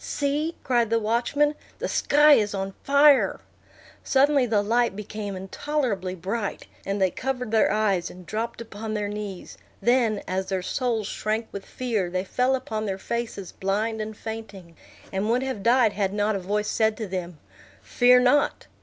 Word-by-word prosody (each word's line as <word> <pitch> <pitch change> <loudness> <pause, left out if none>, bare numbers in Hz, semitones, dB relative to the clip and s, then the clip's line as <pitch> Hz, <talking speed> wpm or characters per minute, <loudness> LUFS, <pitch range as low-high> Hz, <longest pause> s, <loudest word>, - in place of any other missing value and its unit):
"See!" 295 +3 -1
cried 240 -4 +2
the 230 - +2
watchman, 240 +7 +1 0.2
"the - - -3
sky 295 +1 +5
is 210 -6 +2
on 195 0 -3
fire!" 280 0 +5 0.6
Suddenly 275 -1 +3
the 210 -3 +2
light 235 0 +1
became 210 -1 -5
intolerably 195 -1 -2
bright, 195 +4 -4 0.2
and 200 +1 -1
they 190 -2 +2
covered 250 -3 -3
their 220 -1 +3
eyes, 200 -4 +1
and 180 0 -12
dropped 225 +4 -4
upon 220 -1 -6
their 210 -1 -1
knees; 205 -3 -7 0.2
then, 235 -4 +2
as 190 +1 -2
their 190 -2 -2
souls 230 +1 -1
shrank 215 +3 -2
with 200 -1 -8
fear, 225 -8 -2
they 185 +1 -2
fell 250 +6 +1
upon 220 -4 -4
their 190 -1 -2
faces 225 -3 -4
blind 215 +3 -1
and 215 0 -6
fainting, 205 -6 -8 0.4
and 195 +3 -1
would 245 +3 +2
have 260 -6 -3
died 235 0 +4
had 195 -2 -1
not 210 +1 +1
a - - -1
voice 210 +3 -1
said 220 -1 +1
to 220 - -3
them, 180 -3 -5 0.5
"Fear 250 +1 +5
not!" 255 +4 +2
215 Hz, 170 wpm, -25 LUFS, 195-245 Hz, 0.6 s, sky